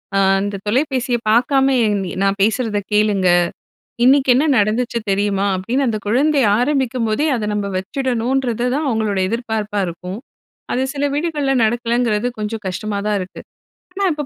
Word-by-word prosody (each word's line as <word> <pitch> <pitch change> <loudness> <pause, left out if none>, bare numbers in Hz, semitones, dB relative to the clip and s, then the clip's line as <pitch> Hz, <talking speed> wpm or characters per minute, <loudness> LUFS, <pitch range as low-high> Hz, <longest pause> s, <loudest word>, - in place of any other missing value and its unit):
"அ - - +3 0.2
அந்த 200 0 -3
தொலைபேசிய 255 0 0
பாக்காம 265 +4 +3
என் 210 -1 +1
நீ 180 - -5
நான் 195 0 +1
பேசுறத 220 0 +1
கேளுங்க! 205 -3 +2 0.8
இன்னைக்கு 270 0 +4
என்ன 270 +5 +3
நடந்துச்சு 230 +3 0
தெரியுமா?" 200 0 +1
அப்டின்னு, 250 +9 -1
அந்த 215 -2 -1
குழந்தை 275 +5 +2 0.2
ஆரம்பிக்கம்போதே, 250 -1 0
அத 210 -2 -3
நம்ம 200 -1 -2
வச்சிடணுன்றது 245 +2 -1
தான் 300 0 -1
அவங்களோட 215 -4 -1
எதிர்பார்ப்பா 220 -3 -2
இருக்கும். 180 +4 -6 0.6
அது 255 - 0
சில 285 0 -1
வீடுகள்ல 295 -3 -1
நடக்கலங்கிறது 235 -1 0
கொஞ்சம் 215 0 -4
கஷ்டமாதான் 205 +2 -2
இருக்கு. 185 0 -8 0.5
ஆனா, 395 0 -1
இப்ப 295 -1 -4
230 Hz, 140 wpm, -19 LUFS, 205-265 Hz, 0.8 s, இன்னைக்கு